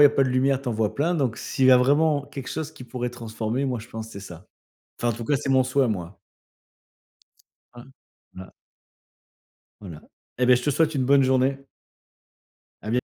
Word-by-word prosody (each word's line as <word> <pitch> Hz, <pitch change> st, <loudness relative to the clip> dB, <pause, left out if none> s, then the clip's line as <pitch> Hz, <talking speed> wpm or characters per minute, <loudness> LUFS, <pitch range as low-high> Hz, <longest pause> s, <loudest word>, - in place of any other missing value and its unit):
il -, -, +9 dB
y -, -, +11 dB
a -, -, +2 dB
pas 135 Hz, -, +2 dB
de 130 Hz, -, -1 dB
lumière, 135 Hz, +1 st, +1 dB
tu 130 Hz, -, -4 dB
en 120 Hz, -, -1 dB
vois 110 Hz, -1 st, -1 dB
plein. 165 Hz, +5 st, 0 dB
Donc 130 Hz, -8 st, -1 dB
s'il 130 Hz, -, 0 dB
y 130 Hz, -, +7 dB
a 125 Hz, -, +8 dB
vraiment 145 Hz, +3 st, +2 dB
quelque 140 Hz, -2 st, -8 dB
chose 160 Hz, -2 st, -5 dB
qui 125 Hz, -, -11 dB
pourrait 125 Hz, 0 st, -4 dB
transformer, 115 Hz, +2 st, -3 dB
moi 125 Hz, -2 st, -2 dB
je 115 Hz, -, -12 dB
pense 110 Hz, -1 st, -7 dB
c'est 100 Hz, -, -9 dB
ça. 90 Hz, 0 st, -11 dB, 0.5 s
Enfin 120 Hz, -, 0 dB
en 115 Hz, -, -1 dB
tout 115 Hz, -, -6 dB
cas, 145 Hz, +4 st, +1 dB
c'est 140 Hz, 0 st, -5 dB
mon 130 Hz, -1 st, +4 dB
souhait 130 Hz, +1 st, +1 dB
à -, -, -2 dB
moi. 90 Hz, -3 st, -5 dB, 1.5 s
Voilà. 120 Hz, -6 st, -15 dB, 1.3 s
Voilà. 85 Hz, -6 st, -10 dB, 0.4 s
Et 125 Hz, -, +2 dB
beh 125 Hz, -, +6 dB
je 125 Hz, -, -2 dB
te 145 Hz, -, +1 dB
souhaite 160 Hz, +1 st, +1 dB
une 130 Hz, -, 0 dB
bonne 140 Hz, +1 st, +5 dB
journée. 130 Hz, +1 st, +2 dB, 1.2 s
A 105 Hz, -, -6 dB
bien 125 Hz, +2 st, +1 dB
125 Hz, 210 wpm, -24 LUFS, 115-140 Hz, 1.5 s, y